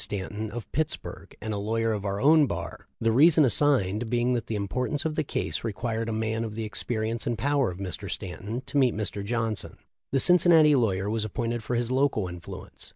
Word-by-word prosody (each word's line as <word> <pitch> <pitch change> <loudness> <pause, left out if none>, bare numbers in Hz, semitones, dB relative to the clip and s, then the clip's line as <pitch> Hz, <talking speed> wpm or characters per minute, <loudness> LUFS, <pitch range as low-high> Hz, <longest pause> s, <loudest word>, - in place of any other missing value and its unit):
Stanton, 105 +2 -3
of 115 +2 -8
Pittsburg, 155 0 -4
and 110 0 -3
a 100 - -2
lawyer 115 +2 0
of 105 -1 -4
our 100 0 -2
own 150 +3 +5
bar, 85 -3 -6
the 115 0 +2
reason 155 +5 +6
assigned 120 -5 +2
being 120 +1 +1
that 120 -2 -2
the 110 - -2
importance 125 +9 -2
of 160 - 0
the 155 - 0
case - - -3
re 115 - -1
quired 115 +1 -3
a - - -2
man 110 +1 -1
of 110 -2 -5
the 115 - -3
experience 110 +1 -3
and 120 -1 -1
power 140 -2 +1
of 90 - -7
Mr. 95 -3 -5
Stanton 100 +7 -5
to 145 - -3
meet 125 -5 +3
Mr. 105 -1 -2
Johnson. 115 -1 -3 0.3
The 135 - +2
Cincinnati 170 -2 +6
law 120 -6 +3
yer 95 +2 -3
was 110 +1 -1
appointed 115 +2 -2
for 120 - -2
his 120 +1 -1
'local 130 -7 +1
influence.' 90 -1 -9
115 Hz, 215 wpm, -27 LUFS, 105-130 Hz, 0.3 s, reason